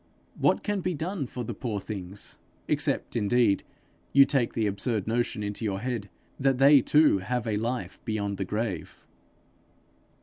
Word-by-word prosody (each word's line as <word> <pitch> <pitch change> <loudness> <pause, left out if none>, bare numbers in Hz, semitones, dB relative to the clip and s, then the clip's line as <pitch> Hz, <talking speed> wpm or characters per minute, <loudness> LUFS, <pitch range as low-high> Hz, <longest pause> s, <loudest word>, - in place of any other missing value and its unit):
What - - +3
can 205 -2 -1
be 180 -1 -1
done 165 -1 -3
for 125 0 -5
the 120 - -4
poor 110 -1 -3
things 100 -1 -6 0.3
except - - 0
indeed 110 -1 +3 0.5
you 140 0 +8
take 135 -5 +1
the 110 - 0
absurd 105 +1 -1
notion 115 -1 -1
into 105 +2 -4
your 100 -3 -1
head, 115 -3 -3 0.3
that 135 -1 +2
they 140 +1 +7
too 150 -6 +4
have 120 +5 -2
a 110 -2 0
life 120 +3 -3
beyond 100 -3 -2
the 95 - -1
grave?' 105 -3 -4
115 Hz, 160 wpm, -27 LUFS, 100-130 Hz, 0.5 s, you